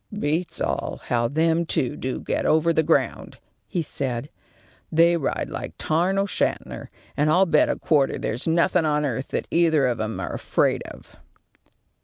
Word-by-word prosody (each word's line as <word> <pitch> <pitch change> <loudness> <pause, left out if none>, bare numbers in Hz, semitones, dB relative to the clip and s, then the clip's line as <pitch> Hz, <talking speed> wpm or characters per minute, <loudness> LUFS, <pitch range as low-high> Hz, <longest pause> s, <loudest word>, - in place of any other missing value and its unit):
"Beats 165 -1 -2
all - - -2
how 120 -1 +2
them 160 +5 +1
two 145 -4 -1
do 130 -2 -4
get - - -2
over 160 +2 +3
the 160 - +3
ground," 155 - 0 0.3
he 175 - -2
said. 135 -2 -4 0.6
"They 170 +2 +5
ride 160 -5 -2
like - - -5
Tarn 175 +5 +1
O'Shanter, 195 0 -2 0.3
and 150 +1 +2
I'll 180 +5 +5
bet 155 -4 +3
a - - 0
quarter 145 -4 +2
there's 120 +8 -3
nothing 170 +1 +3
on 150 -1 +1
earth 135 0 -3
that - - -3
either 160 -4 +3
of 120 -3 0
'em 110 0 -3
are - - -4
afraid - - 0
of." - - -13
155 Hz, 165 wpm, -24 LUFS, 135-170 Hz, 0.6 s, They